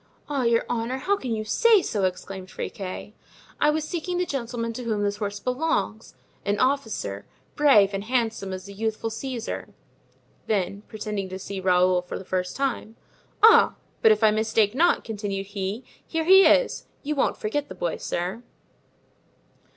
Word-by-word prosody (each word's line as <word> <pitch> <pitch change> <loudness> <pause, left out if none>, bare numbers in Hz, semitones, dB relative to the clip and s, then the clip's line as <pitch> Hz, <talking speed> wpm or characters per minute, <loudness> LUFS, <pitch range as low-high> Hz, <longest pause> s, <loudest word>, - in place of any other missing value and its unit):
"Ah, 285 -2 -1
your 235 -1 +2
honor, 240 +2 -2
how 375 +10 +1
can 260 -11 -5
you 215 -1 -2
say 440 - +4
so?" 205 -4 0
exclaimed 185 +1 -4
Friquet. 195 +2 -6 0.5
"I 300 - +4
was 305 +1 0
seeking 355 +2 -3
the 360 - +1
gentleman 235 -5 -3
to 250 - -6
whom 215 -3 -1
this 205 0 -1
horse 205 -1 -3
belongs—an 250 -6 -3
officer, 225 - -1 0.3
brave 215 -10 +5
and 195 +1 -3
handsome 225 -5 -1
as 185 +1 -6
a 200 - -9
youthful 220 +2 -2
Caesar;" 240 0 -5 0.7
then, 200 -1 -1
pretending 210 -3 -4
to 185 - -5
see 195 +1 -6
Raoul 180 -1 +3
for 180 - -6
the 190 - -9
first 180 0 -2
time: 260 -5 -2 0.5
"Ah! 445 - +7 0.3
but 220 - +7
if 215 +1 +2
I 215 - +6
mistake 220 -1 +2
not," 340 +7 +3
continued 205 -3 -4
he, 200 +3 -4 0.2
"here 325 0 -2
he 385 +2 +8
is; - - +2 0.2
you 300 +1 -1
won't 280 - +1
forget 285 +7 -2
the - - -8
boy, 170 -2 -2
sir." 180 +6 -3
220 Hz, 165 wpm, -25 LUFS, 195-265 Hz, 0.7 s, he